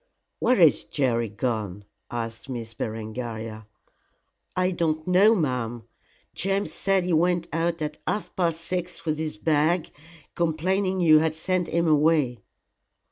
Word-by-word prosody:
"Where 250 - +3
is 165 -4 +5
Jerry 120 -5 0
gone?" 105 -3 -3 0.2
asked 115 +1 -5
Miss 115 -3 -5
Berengaria. 110 0 -5 0.9
"I 185 0 +2
don't 160 -3 -1
know, 195 +5 +5
ma'am. 125 - -2 0.5
James 195 +2 -1
said 195 -2 +2
he 180 -1 -1
went 175 +1 +2
out 165 0 0
at 150 0 -4
half 210 - -2
past 170 -3 0
six 180 0 -4
with 155 -1 -1
his 155 -8 -3
bag, 155 - +1 0.4
complaining 185 +3 0
you 155 -3 +7
had 160 0 0
sent 180 +2 0
him 170 0 +1
away." 150 -5 +3
155 Hz, 135 wpm, -25 LUFS, 120-175 Hz, 0.9 s, you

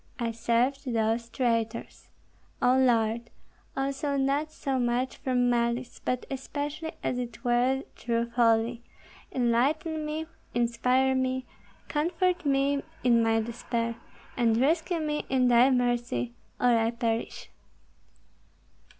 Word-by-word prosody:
I 235 -3 -1
served 245 +4 0
those 225 +1 0
traitors, 230 -2 -2 0.5
O 250 +1 +4
Lord, 235 -2 +2 0.5
also 275 +1 -1
not 280 +3 0
so 270 -3 -2
much 245 +1 0
from 250 -2 +1
malice, 235 +1 0
but 250 -1 -1
especially 290 +4 -4
as 250 - -1
it 240 -3 -6
were 250 +3 +2
through 235 0 -1
folly; 230 0 +2 0.5
enlighten 285 +6 +1
me, 305 +1 -3 0.3
inspire 250 +2 +2
me, 260 0 0 0.4
comfort 340 +2 0
me 275 0 +2 0.2
in 235 -2 +5
my 225 0 +2
despair, 230 0 -3 0.4
and 230 -2 +2
rescue 325 +6 +1
me 300 -1 -1
in 255 -2 +3
thy 240 +2 +6
mercy, 240 - 0 0.3
or 245 -1 +4
I 225 0 +2
perish." 230 -1 -3
245 Hz, 115 wpm, -28 LUFS, 235-275 Hz, 0.5 s, thy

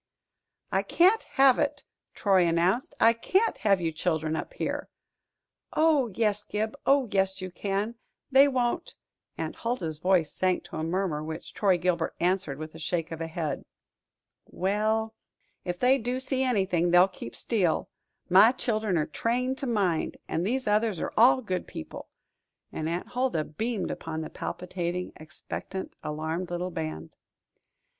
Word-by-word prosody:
"I - - +2
can't 380 +6 +4 0.2
have 270 -2 +6
it," - - -1 0.3
Troy 190 -4 +3
announced. 175 +9 +1
"I 230 +1 +6
can't 380 - +1
have 200 -3 +3
you 165 -2 -1
children 160 -1 -1
up - - -5
here." - - -3 0.8
"Oh, 310 -5 +4
yes, 210 -2 +1
Gib 215 +3 -2
oh, 275 -2 +4
yes, 190 -1 +1
you 185 -1 -5
can. 200 +4 -2 0.4
They 270 +2 +7
won't 260 +5 -1 0.2
" - - -50
Aunt - - -4
Huldah's 175 -11 -3
voice 180 -3 +2
sank 185 -1 +1
to - - -8
a 155 - -2
murmur, 165 -2 -1
which 160 +1 -7
Troy 195 -3 +3
Gilbert 175 -2 0
answered 180 -5 0
with 155 +1 -7
a 160 - -10
shake 165 +1 -2
of 165 - -5
the 165 - -3
head. 160 -3 -3 0.8
"Well, 215 +3 0 0.5
ef 175 0 -2
they 255 +6 +4
do 245 +3 -2
see 260 0 -1
anything, 190 -9 +1
they'll 175 +2 +6
keep 180 -11 -9
still 190 -9 0 0.4
my 195 +7 +7
chil'en 215 -7 0
are 155 - +1
trained 250 +3 -1
to 275 - -3
mind; 195 -8 0
and 165 - -1
these 255 +7 -1
others 210 -3 +1
are - - -3
all 255 +3 +6
good 185 -4 -3
people;" - - -8 0.6
and 155 0 -3
Aunt 170 +2 -3
Huldah 245 -10 0
beamed 215 +7 -3
upon 160 -1 -5
the 155 - -6
palpitating, 180 0 -4
expectant, 155 +4 -7
alarmed 160 +4 -3
little 175 +1 -3
band. 80 - -5
190 Hz, 155 wpm, -28 LUFS, 165-230 Hz, 0.8 s, They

